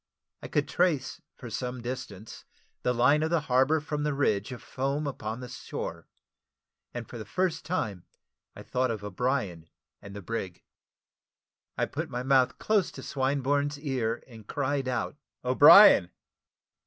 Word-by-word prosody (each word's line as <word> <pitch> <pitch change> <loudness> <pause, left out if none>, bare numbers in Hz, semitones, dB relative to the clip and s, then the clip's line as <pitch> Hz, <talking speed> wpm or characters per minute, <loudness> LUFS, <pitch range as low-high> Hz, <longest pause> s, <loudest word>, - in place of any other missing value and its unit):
I - - -7
could - - 0
trace, 165 -8 0
for 120 - -9
some 125 +2 -4
distance, 120 -5 -7 0.4
the 125 - +1
line 125 +5 +4
of 160 - 0
the 170 -2 +1
harbour, 135 +3 +3
from 150 0 -4
the 150 -1 -1
ridge 105 -7 0
of 125 - -8
foam 140 +3 -2
upon 115 -4 -4
the 125 - -7
shore; 85 -7 -6 0.8
and 120 -2 -6
for 120 - -9
the - - -5
first 175 - -1
time 105 - -3 0.5
I - - -10
thought 130 0 0
of 110 -3 -4
O'Brien 100 - -2 0.3
and 100 0 -10
the 100 - -8
brig. 95 -4 -5 1.1
I - - +1
put - - -5
my 125 +1 -4
mouth 130 -1 +3
close 210 -4 +1
to - - -9
Swinburne's 140 +2 0
ear, 125 -6 -2
and 110 -4 -14
cried 135 -1 -1
out, 130 +3 -2 0.3
"O'Brien!" 130 - +8
130 Hz, 155 wpm, -28 LUFS, 110-145 Hz, 1.1 s, O'Brien